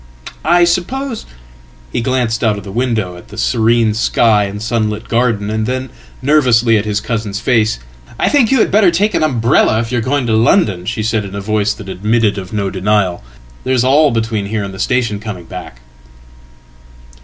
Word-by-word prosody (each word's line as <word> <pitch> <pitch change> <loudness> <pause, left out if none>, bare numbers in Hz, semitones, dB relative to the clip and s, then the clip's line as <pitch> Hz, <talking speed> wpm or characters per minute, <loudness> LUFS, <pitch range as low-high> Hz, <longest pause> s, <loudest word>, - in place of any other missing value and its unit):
I 175 +2 +4
suppose 225 +9 -1 0.7
"He - - 0
glanced 120 -3 -1
out 110 -2 +2
of 100 - -8
the 100 - -8
window 110 -6 -1
at 90 - -14
the 105 - -12
serene 115 -1 +2
sky 110 -1 +2
and 100 +1 -6
sunlit 110 -1 -2
garden, 115 -3 0
and 110 0 -1
thennervously 130 -2 +1
at 105 - -4
his 105 -1 -1
cousin's 105 -2 -3
face."I 110 - -1
think 275 -7 +3
you 270 - +4
had - - +1
better 205 -2 +5
take 200 +5 +1
an - - +1
umbrella 120 -6 +2
if 115 0 -3
you 125 - 0
are - - -1
going 130 +2 0
to 115 - 0
London," 110 - +2
shesaid 110 -1 -1
in 100 0 -8
a - - -3
voice 105 0 0
that 105 - -11
admitted 105 +2 0
of 95 -1 -9
no 100 -3 -2
denial. 95 - 0 0.4
"There's 130 -2 +1
all 145 +4 +4
between 110 -3 -2
here 105 0 -2
andthe 95 -1 -7
station 115 -5 0
coming 100 -5 -7
back." - - -9
110 Hz, 180 wpm, -15 LUFS, 105-125 Hz, 0.7 s, better